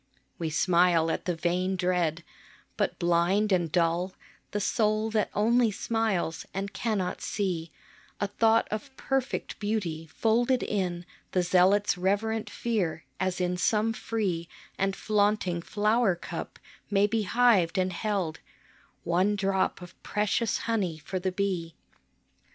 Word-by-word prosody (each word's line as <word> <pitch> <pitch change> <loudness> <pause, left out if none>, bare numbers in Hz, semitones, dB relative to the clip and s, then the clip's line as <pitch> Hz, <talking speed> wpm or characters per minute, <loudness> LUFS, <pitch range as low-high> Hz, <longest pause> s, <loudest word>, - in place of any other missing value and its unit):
We 165 -2 -1
smile 170 0 +3
at - - -3
the 180 - 0
vain 180 +3 0
dread; 180 -3 0 0.5
but - - -1
blind 175 +5 +2
and 175 -4 +2
dull 175 +2 +1 0.3
The 205 - -2
soul 215 +1 +1
that 215 -2 +1
only 230 +2 +3
smiles, 210 -6 -1
and 200 +1 -3
cannot 200 -3 -2
see 175 -5 -2 0.5
A - - +1
thought 225 +3 +3
of 240 +6 -5
perfect 270 -1 -2
beauty 185 -7 -2
folded 235 +8 +1
in 180 -4 -2 0.3
The 180 - +2
zealot's 185 +2 +3
reverent 210 +4 0
fear, 190 -9 -2
as 185 0 -1
in 180 0 0
some 215 +4 +2
free 190 -8 -2 0.3
And 195 0 0
flaunting 205 -4 +1
flower 210 +1 +2
cup 170 - -7 0.3
may 200 0 +4
be 220 +2 0
hived 205 -5 +3
and 185 0 +1
held 190 -4 -2 0.6
One 185 +5 +2
drop 195 -2 0
of 175 - -14
precious 210 +2 0
honey 200 -8 0
for 185 +4 -4
the 185 +1 -1
bee. 180 -4 -2
195 Hz, 135 wpm, -28 LUFS, 175-215 Hz, 0.6 s, may